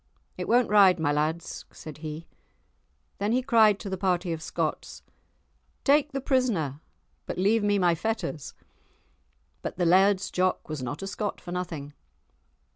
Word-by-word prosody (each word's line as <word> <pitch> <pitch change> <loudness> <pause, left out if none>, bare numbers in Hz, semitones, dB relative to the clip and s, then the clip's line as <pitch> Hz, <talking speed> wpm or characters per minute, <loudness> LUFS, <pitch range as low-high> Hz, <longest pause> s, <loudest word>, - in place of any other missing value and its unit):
"It - - -5
won't 245 +1 +4
ride, 195 -4 +6
my 150 -2 +1
lads," 155 +3 -2
said 155 -1 -11
he. 155 +1 -6 0.9
Then 205 +3 0
he 255 +1 +1
cried 220 -5 +4
to 210 - -6
the 190 -1 -4
party 180 -2 0
of 160 - -6
Scots: - - -4 0.8
"Take 295 +1 +3
the 275 - -2
prisoner, 230 - 0 0.5
but - - -4
leave 205 +4 +2
me 205 0 +2
my 175 -3 +3
fetters." 170 - -3 1.1
But - - -5
the 180 - +1
Laird's 190 +2 +4
Jock 185 0 0
was 155 -3 -5
not 145 +8 -5
a - - -4
Scot 205 +1 -4
for 175 - -9
nothing. 165 -5 -5
185 Hz, 155 wpm, -27 LUFS, 160-215 Hz, 1.1 s, ride